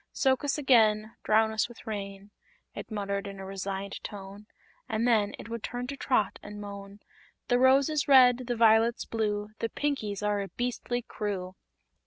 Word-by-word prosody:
"Soak 265 Hz, 0 st, +2 dB
us 285 Hz, 0 st, 0 dB
again 220 Hz, -6 st, +3 dB
Drown 220 Hz, +1 st, +3 dB
us 220 Hz, +2 st, 0 dB
with 240 Hz, -, -14 dB
rain!" 200 Hz, -2 st, -6 dB, 0.4 s
it -, -, -8 dB
muttered 200 Hz, -1 st, -3 dB
in 195 Hz, -1 st, -8 dB
a 190 Hz, -, -7 dB
resigned 195 Hz, 0 st, -5 dB
tone; 200 Hz, +1 st, -9 dB, 0.4 s
and 220 Hz, +2 st, 0 dB
then 215 Hz, -4 st, +2 dB
it -, -, -9 dB
would 230 Hz, 0 st, -5 dB
turn 245 Hz, +3 st, -4 dB
to 280 Hz, +3 st, -5 dB
Trot 250 Hz, -6 st, 0 dB
and 205 Hz, 0 st, -9 dB
moan: 200 Hz, 0 st, -9 dB, 0.5 s
"The 245 Hz, 0 st, +3 dB
rose 265 Hz, +2 st, +5 dB
is 305 Hz, -2 st, -1 dB
red, 255 Hz, -2 st, +6 dB
the 245 Hz, -, -1 dB
violet's 225 Hz, +1 st, +4 dB
blue; 210 Hz, -2 st, -2 dB
The 230 Hz, -, -1 dB
Pinkies 215 Hz, -10 st, -2 dB
are 205 Hz, -1 st, +1 dB
a 195 Hz, -, -4 dB
beastly 245 Hz, +1 st, -3 dB
crew!" 190 Hz, -5 st, -4 dB
215 Hz, 175 wpm, -28 LUFS, 200-245 Hz, 0.5 s, red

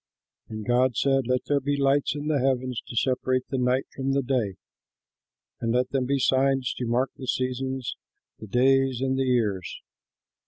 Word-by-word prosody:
And 110 Hz, -1 st, -6 dB
God 125 Hz, 0 st, +2 dB
said, 135 Hz, -3 st, +2 dB
"Let 125 Hz, 0 st, +1 dB
there 145 Hz, -1 st, +2 dB
be 145 Hz, +1 st, -1 dB
lights 140 Hz, +1 st, +2 dB
in 145 Hz, 0 st, -5 dB
the 150 Hz, -2 st, +1 dB
heavens 130 Hz, -2 st, 0 dB
to -, -, -8 dB
separate 130 Hz, +1 st, 0 dB
the 135 Hz, -, -1 dB
night 125 Hz, +1 st, +1 dB
from 135 Hz, 0 st, -1 dB
the 140 Hz, 0 st, +1 dB
day. 120 Hz, -7 st, -1 dB, 1.1 s
Let 125 Hz, +2 st, +1 dB
them 130 Hz, -2 st, 0 dB
be 140 Hz, +1 st, +1 dB
signs 135 Hz, -1 st, +2 dB
to 125 Hz, -, -2 dB
mark 125 Hz, +3 st, +1 dB
the 130 Hz, -, -8 dB
seasons, 130 Hz, 0 st, -2 dB, 0.4 s
the 110 Hz, -, -9 dB
days, 135 Hz, +2 st, +3 dB
and 130 Hz, 0 st, +1 dB
the 135 Hz, 0 st, 0 dB
years. 110 Hz, -8 st, -1 dB
130 Hz, 170 wpm, -26 LUFS, 125-135 Hz, 1.1 s, days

